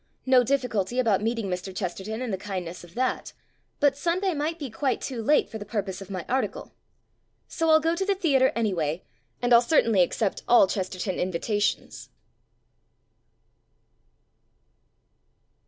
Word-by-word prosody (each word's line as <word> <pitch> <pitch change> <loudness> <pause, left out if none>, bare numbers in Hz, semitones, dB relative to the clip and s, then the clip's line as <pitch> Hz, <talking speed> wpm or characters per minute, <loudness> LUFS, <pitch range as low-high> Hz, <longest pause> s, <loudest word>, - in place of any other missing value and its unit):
No 260 -1 +5
difficulty 245 -4 -1
about 225 -6 +2
meeting 230 0 -1
Mr. 185 0 -4
Chesterton 200 +5 -4
in 245 - -3
the - - 0
kind 195 -3 -4
ness 170 +2 -8
of 175 0 -15
that. 255 +1 -2 0.5
But 285 -2 +3
Sunday 350 +5 0
might 310 +2 -2
be 280 -7 -6
quite 260 +2 -1
too 250 -4 -4
late 290 +3 +3
for 220 +2 -7
the - - -5
purpose 200 -3 -4
of 195 - -10
my 185 -3 -5
article. 245 -6 -2 0.7
So 325 - -2
Til 315 0 +6
go 330 +2 +1
to 385 +2 -1
the 400 - +2
theatre 275 -9 +3
any 220 -4 0
way, 160 0 -2 0.4
and 245 0 +3
I'll 235 - +8
certainly 230 - +3
accept 195 +3 0
all 240 -4 +7
Ches 190 -1 -3
terton 185 0 -4
invitations. 195 +4 -2
225 Hz, 155 wpm, -26 LUFS, 190-270 Hz, 0.7 s, I'll